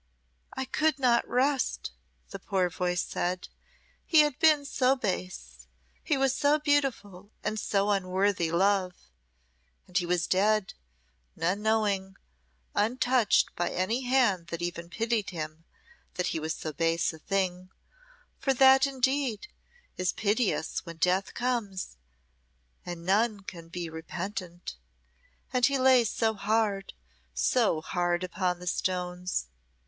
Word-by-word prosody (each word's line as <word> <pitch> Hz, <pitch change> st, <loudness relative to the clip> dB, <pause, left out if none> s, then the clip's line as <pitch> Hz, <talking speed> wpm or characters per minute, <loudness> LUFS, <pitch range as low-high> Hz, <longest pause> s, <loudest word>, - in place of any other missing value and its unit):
"I 265 Hz, -, -1 dB
could 310 Hz, +2 st, +1 dB
not 245 Hz, -3 st, +2 dB
rest," 265 Hz, +2 st, 0 dB, 0.4 s
the 195 Hz, -, -6 dB
poor 185 Hz, -3 st, 0 dB
voice 180 Hz, +1 st, -1 dB
said. 180 Hz, +1 st, -3 dB, 0.5 s
"He 320 Hz, -2 st, +6 dB
had 295 Hz, -2 st, 0 dB
been 310 Hz, -3 st, +4 dB
so 265 Hz, -1 st, +2 dB
base, 180 Hz, -, -5 dB, 0.4 s
he 290 Hz, -, +1 dB
was 270 Hz, -1 st, +2 dB
so 290 Hz, +2 st, +3 dB
beautiful, 270 Hz, -10 st, -1 dB
and 215 Hz, +1 st, -2 dB
so 200 Hz, 0 st, +1 dB
unworthy 190 Hz, -2 st, +1 dB
love 185 Hz, 0 st, +2 dB, 0.9 s
and 180 Hz, -, -21 dB
he 175 Hz, -3 st, +2 dB
was 175 Hz, -1 st, +1 dB
dead, 205 Hz, +1 st, +2 dB, 0.6 s
none 180 Hz, +5 st, -1 dB
knowing, 205 Hz, -3 st, 0 dB, 0.6 s
untouched 245 Hz, 0 st, +2 dB
by 175 Hz, -, -1 dB
any 205 Hz, +8 st, -1 dB
hand 240 Hz, -9 st, +2 dB
that 170 Hz, 0 st, -5 dB
even 170 Hz, -1 st, -4 dB
pitied 225 Hz, +1 st, -1 dB
him 160 Hz, -2 st, -6 dB, 0.5 s
that 180 Hz, -, -1 dB
he -, -, -1 dB
was 155 Hz, +1 st, -3 dB
so 155 Hz, -, -5 dB
base 165 Hz, +3 st, +1 dB
a 160 Hz, -, -11 dB
thing, 185 Hz, 0 st, -2 dB, 0.7 s
for 270 Hz, -1 st, +1 dB
that 265 Hz, +1 st, +6 dB
indeed 265 Hz, -, -1 dB, 0.5 s
is 185 Hz, -1 st, 0 dB
piteous 210 Hz, -4 st, 0 dB
when 170 Hz, -1 st, -9 dB
death 180 Hz, +3 st, +1 dB
comes 230 Hz, -, -2 dB, 0.9 s
and 175 Hz, -1 st, -7 dB
none 210 Hz, +2 st, +2 dB
can 170 Hz, -3 st, -10 dB
be 175 Hz, 0 st, -5 dB
repentant. 175 Hz, -, -6 dB, 0.8 s
And 250 Hz, -1 st, +1 dB
he 280 Hz, +2 st, +4 dB
lay 260 Hz, -2 st, +5 dB
so 220 Hz, +1 st, 0 dB
hard, 210 Hz, -1 st, 0 dB, 0.4 s
so -, -, +2 dB
hard 175 Hz, +1 st, -1 dB
upon 180 Hz, 0 st, -1 dB
the 180 Hz, -, -10 dB
stones." 180 Hz, -, -2 dB
195 Hz, 130 wpm, -28 LUFS, 180-245 Hz, 0.9 s, He